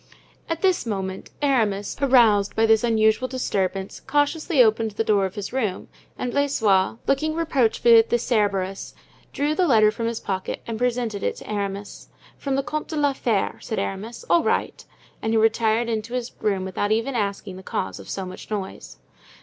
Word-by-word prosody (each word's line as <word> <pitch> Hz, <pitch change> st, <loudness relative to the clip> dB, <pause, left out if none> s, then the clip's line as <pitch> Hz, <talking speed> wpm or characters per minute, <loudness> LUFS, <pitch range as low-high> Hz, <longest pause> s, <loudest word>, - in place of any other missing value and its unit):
At 330 Hz, +2 st, -3 dB
this 370 Hz, -9 st, +2 dB
moment 190 Hz, -3 st, -4 dB
Aramis, 215 Hz, -8 st, +1 dB
aroused 230 Hz, -7 st, +4 dB
by 225 Hz, -, +3 dB
this 220 Hz, 0 st, +4 dB
unusual 220 Hz, +1 st, +2 dB
disturbance, 195 Hz, -7 st, -2 dB
cautiously 295 Hz, +2 st, 0 dB
opened 220 Hz, 0 st, +2 dB
the -, -, +2 dB
door 200 Hz, -3 st, +2 dB
of 190 Hz, -, -13 dB
his 205 Hz, +2 st, -5 dB
room; 215 Hz, -8 st, -2 dB, 0.3 s
and 250 Hz, -, -3 dB
Blaisois, 225 Hz, -9 st, +2 dB
looking 310 Hz, +3 st, +1 dB
reproachfully 245 Hz, -7 st, +4 dB
at 225 Hz, -, +1 dB
the 240 Hz, -, +3 dB
Cerberus, 200 Hz, -5 st, -1 dB, 0.4 s
drew 290 Hz, +2 st, 0 dB
the 355 Hz, +3 st, +2 dB
letter 215 Hz, -6 st, +5 dB
from 230 Hz, +1 st, -3 dB
his 230 Hz, -1 st, -2 dB
pocket 190 Hz, -1 st, -4 dB
and 225 Hz, -1 st, -5 dB
presented 240 Hz, -4 st, -1 dB
it -, -, -1 dB
to -, -, -12 dB
Aramis. 200 Hz, -1 st, -4 dB, 0.3 s
"From 275 Hz, -2 st, -2 dB
the 275 Hz, -, 0 dB
Comte 305 Hz, +2 st, -4 dB
de 320 Hz, -, -5 dB
la 290 Hz, -2 st, +2 dB
Fere," 230 Hz, -7 st, -1 dB
said 220 Hz, -, -4 dB
Aramis. 215 Hz, +5 st, -4 dB
"All 340 Hz, -, +4 dB
right." -, -, -1 dB, 0.4 s
And 220 Hz, -, -1 dB
he -, -, +3 dB
retired 225 Hz, +1 st, +2 dB
into 225 Hz, +1 st, -3 dB
his 250 Hz, -1 st, -3 dB
room 195 Hz, -3 st, 0 dB
without 195 Hz, +2 st, -2 dB
even 230 Hz, +5 st, +1 dB
asking 200 Hz, -4 st, -3 dB
the -, -, -9 dB
cause 95 Hz, -, -4 dB
of 100 Hz, -, -11 dB
so 195 Hz, -, -4 dB
much 185 Hz, 0 st, -10 dB
noise. 200 Hz, -3 st, -6 dB
225 Hz, 180 wpm, -23 LUFS, 200-255 Hz, 0.4 s, letter